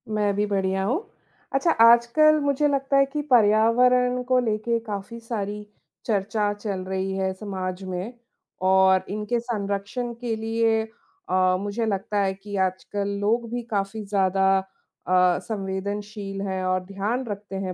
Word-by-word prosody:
मैं 205 -1 +1
भी 205 +1 +1
बढ़िया 190 -1 0
हूँ। 290 - -1 0.5
अच्छा 300 +5 +2
आजकल 235 +7 +6
मुझे 285 +1 +2
लगता 275 -1 +1
है 275 - +5
कि 300 - -1
पर्यावरण 245 +3 +4
को 255 0 +2
लेके 230 0 0
काफ़ी 210 +2 -6
सारी 210 -3 -4 0.4
चर्चा 210 -1 0
चल 205 -2 -4
रही 190 0 -2
है 190 0 0
समाज 185 -2 -5
में 185 +5 -5 0.5
और 190 0 +4
इनके 210 +4 -1
संरक्षण 220 +1 -3
के 235 -2 -1
लिए 225 0 +1 0.5
अ, 185 0 +3
मुझे 205 +3 -2
लगता 205 0 -2
है 195 -1 +1
कि 205 +1 -9
आजकल 200 +2 -3
लोग 230 +3 +1
भी 245 - -2
काफ़ी 200 +1 -2
ज़्यादा 195 -1 +2
अ, 185 -1 0
संवेदनशील 200 0 -4
हैं 190 -1 -2
और 185 0 0
ध्यान 205 +7 -2
रखते 205 -1 -6
हैं 190 -1 -3
205 Hz, 145 wpm, -24 LUFS, 195-235 Hz, 0.5 s, आजकल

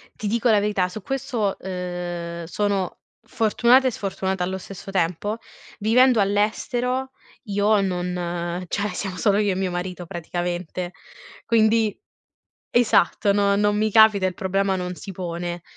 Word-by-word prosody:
Ti 215 - -4
dico 235 +3 +1
la 215 - +5
verità, 200 -3 +1
su 215 +4 -7
questo, 245 -4 -2
uhm, 175 -2 -5
sono 195 +1 -1 0.3
fortunata 240 +4 +4
e - - +1
sfortunata 190 -2 -2
allo 190 +1 -2
stesso 195 +1 -9
tempo: 190 +4 -1 0.4
vivendo 240 +3 +4
all'estero 245 +6 0 0.4
io 205 +1 +3
non 175 -1 -2
cioè 200 +3 -1
siamo 195 -2 -4
solo 200 +3 +2
io 205 -1 +2
e 185 - -1
mio 190 -1 -1
marito 180 0 -4
praticamente, 175 +1 -4 0.5
quindi 220 -1 +3 0.8
esatto 230 -3 +3
no 200 0 +2
non 205 0 +2
mi 215 +1 +1
capita, 215 -3 +6
il 185 - -2
problema 195 +1 0
non 180 0 -4
si 195 +2 -9
pone. 175 -1 -4
195 Hz, 140 wpm, -23 LUFS, 180-215 Hz, 0.8 s, capita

